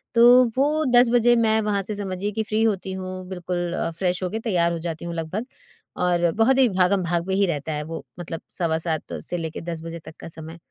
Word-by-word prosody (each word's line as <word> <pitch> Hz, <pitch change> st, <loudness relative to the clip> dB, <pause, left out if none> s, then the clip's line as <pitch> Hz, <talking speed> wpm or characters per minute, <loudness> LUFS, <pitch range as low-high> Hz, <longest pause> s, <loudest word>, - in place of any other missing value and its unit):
तो 255 Hz, +6 st, +5 dB
10 245 Hz, -1 st, +6 dB
बजे 240 Hz, 0 st, +5 dB
मैं 220 Hz, -1 st, +3 dB
वहाँ 210 Hz, -2 st, 0 dB
से 210 Hz, +2 st, -4 dB
समझिए 200 Hz, 0 st, -3 dB
कि 220 Hz, +2 st, -2 dB
फ्री 215 Hz, +1 st, -1 dB
होती 195 Hz, -3 st, 0 dB
हूँ, 185 Hz, -1 st, -6 dB
बिल्कुल 175 Hz, -1 st, -3 dB
अ, -, -, -1 dB
फ्रेश 180 Hz, -1 st, 0 dB
होकर 215 Hz, +5 st, -2 dB
तैयार 175 Hz, -6 st, +2 dB
हो 170 Hz, -, -3 dB
जाती 165 Hz, 0 st, -5 dB
हूँ 170 Hz, -, -4 dB
लगभग। 165 Hz, +8 st, -3 dB, 0.6 s
और 175 Hz, -1 st, +2 dB
बहुत 245 Hz, +4 st, +4 dB
ही 260 Hz, -2 st, +6 dB
भागम-भाग 180 Hz, -2 st, +1 dB
पे 190 Hz, -, -1 dB
ही 200 Hz, +1 st, +3 dB
रहता 155 Hz, -1 st, -2 dB
है 150 Hz, 0 st, -3 dB
वो, 165 Hz, -, -6 dB
मतलब 165 Hz, -1 st, -6 dB, 0.2 s
सवा 160 Hz, -2 st, +1 dB
7 160 Hz, -2 st, -3 dB, 0.2 s
से 175 Hz, -, -1 dB
लेकर 160 Hz, -2 st, -5 dB
10 160 Hz, -1 st, -6 dB
बजे 165 Hz, 0 st, -7 dB
तक -, -, -11 dB
का -, -, -8 dB
समय। 160 Hz, 0 st, -9 dB
185 Hz, 220 wpm, -23 LUFS, 170-220 Hz, 0.6 s, 10